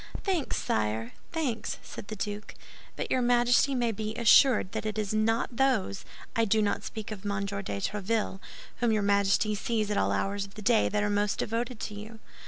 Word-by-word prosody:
"Thanks, 370 -7 0
sire, 110 +2 -1 0.2
thanks," 290 -9 -2
said - - -9
the 215 - -5
duke; 205 +1 -5 0.4
"but - - -4
your 255 - +3
Majesty 245 +3 +4
may 240 -2 +1
be 215 +1 -4
assured 235 -2 +5
that - - -3
it 215 0 -3
is 215 -1 -1
not 225 +2 +1
those—I 230 -3 -1
do 220 0 +3
not 205 -1 +1
speak 220 -1 -6
of 210 -3 -6
Monsieur 200 -1 -2
de 100 - -4
Tréville—whom 210 - -2
your 215 -1 +1
Majesty 200 +1 +3
sees 215 0 -1
at 205 - 0
all - - +2
hours 200 0 -1
of 195 0 -11
the 215 - -8
day 225 +1 +4
that 210 0 0
are 205 - +1
most 205 0 +1
devoted 230 +1 -2
to 210 - -4
you." 215 +2 -9
215 Hz, 190 wpm, -29 LUFS, 200-230 Hz, 0.4 s, assured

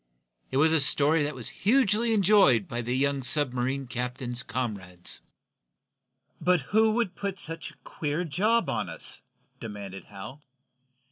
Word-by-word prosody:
It 130 - -2
was 160 +3 +4
a 160 - +5
story 150 +3 +6
that 145 0 -2
was 125 -3 -2
hugely 225 0 +3
enjoyed 205 -2 +4
by 120 -5 -4
the 120 +2 -2
young 140 0 0
submarine 130 -1 0
captain's 125 0 -4
comrades. 100 -9 -4 1.2
"But 180 -2 +2
who 220 0 +4
would 230 -6 0
put 200 +1 -4
up - - -13
such 165 -2 -5
a - - -18
queer 150 +3 -3
job 210 +9 +1
on 105 -5 -2
us?" - - -5 0.4
demanded 100 -3 -8
Hal. 105 +8 -10
140 Hz, 145 wpm, -27 LUFS, 120-185 Hz, 1.2 s, story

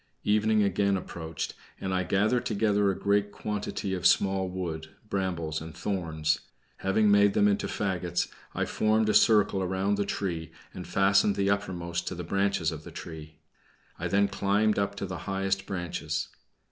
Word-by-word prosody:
Evening 105 0 +3
again 100 0 +2
approached, 80 -3 -5 0.3
and 95 -1 -2
I 90 - +1
gathered 105 +6 +1
together 105 -2 +2
a 95 - -1
great 100 0 +1
quantity 105 -2 -3
of 90 -2 +3
small 95 -1 +2
wood, 85 -4 -4 0.2
brambles, 85 -5 -2
and 80 0 -9
thorns. 80 -5 -1 0.4
Having 105 +2 +2
made 100 0 +5
them 105 - +5
into 100 -1 +1
fagots, 90 -3 -1 0.3
I - - 0
formed 110 0 +2
a - - +3
circle 105 -3 +4
round 95 +2 0
the 100 - +1
tree, 85 -5 -3 0.2
and - - -7
fastened 100 +1 +3
the 100 0 +2
uppermost 85 -3 -2
to 90 - -3
the 90 - -5
branches 95 -2 +1
of 80 -1 -7
the - - -9
tree. 80 -2 -9 0.6
I - - -1
then 100 +1 +3
climbed 100 +2 +1
up 100 0 -1
to 100 - -4
the 90 -3 -5
highest 95 0 -1
branches. 85 -4 -3
95 Hz, 165 wpm, -28 LUFS, 85-100 Hz, 0.6 s, made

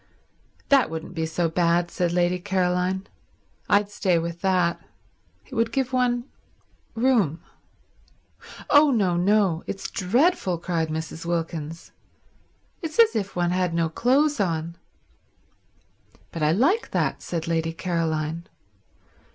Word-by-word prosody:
"That 275 -3 +4
wouldn't 160 +2 -6
be 160 -2 -2
so 165 +2 0
bad," 170 +1 +1
said 175 -2 0
Lady 175 +1 +1
Caroline. 185 0 0 0.6
"I'd 205 0 +3
stay 185 -4 +1
with 170 +1 -4
that. 180 -3 +1 0.6
It - - -15
would 230 -1 0
give 260 +1 -1
one 245 -1 +1 0.7
room." 225 - +2 1.3
"Oh 295 +1 +7
no, 200 -9 +2
no—it's 190 -1 0
dreadful," 205 - +1
cried 165 -1 -2
Mrs. 160 +1 -5
Wilkins. 165 -1 -4 0.9
"It's 320 -3 -5
as 460 - +5
if 200 -3 -2
one 175 -1 +1
had 180 -2 0
no 165 -1 +1
clothes 270 - +2
on." 170 -3 -1 1.6
"But 165 - -6
I 150 0 +3
like 290 - +2
that," - - -1
said 165 -1 -4
Lady 165 -1 0
Caroline. 165 -1 -2
180 Hz, 120 wpm, -24 LUFS, 165-220 Hz, 1.6 s, Oh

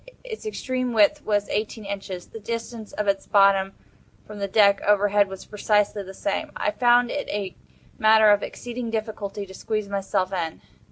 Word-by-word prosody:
Its 445 -3 -7
extreme 255 - -2
width 225 +8 +4
was 205 -1 0
eighteen 215 0 -3
inches. 195 -2 -5
The 225 - -9
distance 230 0 -6
of 210 -1 -3
its 195 -1 0
bottom 195 -1 +4 0.5
from 210 -1 -10
the 200 - -1
deck 200 0 +4
overhead 205 0 +3
was 190 -1 -9
precisely 210 0 +1
the 190 -1 -9
same. 195 +1 -3
I 210 - 0
found 245 +1 +3
it 290 - -3
a 200 -3 -3 0.4
matter 220 -1 +6
of 205 0 +4
exceeding 240 -1 -5
difficulty 215 -2 -4
to 190 - -12
squeeze 215 +1 -3
myself 195 -1 -1
in. 165 -3 -3
210 Hz, 170 wpm, -24 LUFS, 200-225 Hz, 0.5 s, matter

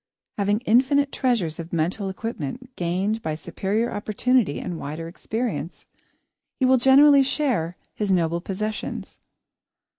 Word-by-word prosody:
Having 205 +2 +1
infinite 265 +4 +3
treasures 210 -12 0
of 165 0 -7
mental 175 +5 -1
equipment, 230 - -6
gained 190 +6 -1
by 155 -5 -2
superior 205 +8 -2
opportunity 215 - +1
and 175 -3 -5
wider 155 +3 -5
experience, 220 +1 -4 0.7
he 260 - +3
will 260 0 +5
generously 275 +3 +7
share 260 - 0 0.2
his 205 -2 -1
noble 170 -2 +1
possessions. 210 +4 -5
210 Hz, 120 wpm, -24 LUFS, 170-255 Hz, 0.7 s, generously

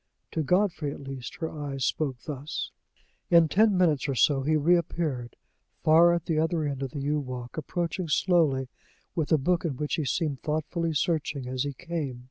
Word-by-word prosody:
To 160 - -1
Godfrey, 175 -2 +1
at - - -8
least, 135 -3 -7
her 160 - -4
eyes 140 -4 -3
spoke 140 -5 -1
thus. 145 0 -5 0.6
In 170 -1 +6
ten 210 +1 +4
minutes 155 -7 +2
or 135 - 0
so 135 +2 +3
he 155 +4 +1
reappeared, 155 -6 +1 0.5
far 165 +2 +6
at 170 -2 0
the 160 -2 +1
other 160 0 +1
end 140 -2 -3
of 135 - -2
the 140 +2 -5
yew 150 +2 0
walk, 125 -3 -6
approaching 170 +3 -2
slowly, 150 -5 +2 0.5
with 160 -4 -2
a 160 - +6
book, 170 +5 +1
in 150 -7 -2
which 150 +1 -3
he 155 - -1
seemed 145 0 -1
thoughtfully 160 +2 -1
searching 145 -4 -1
as 130 0 -2
he 140 - -3
came. 155 -5 -4
150 Hz, 185 wpm, -27 LUFS, 135-170 Hz, 0.6 s, In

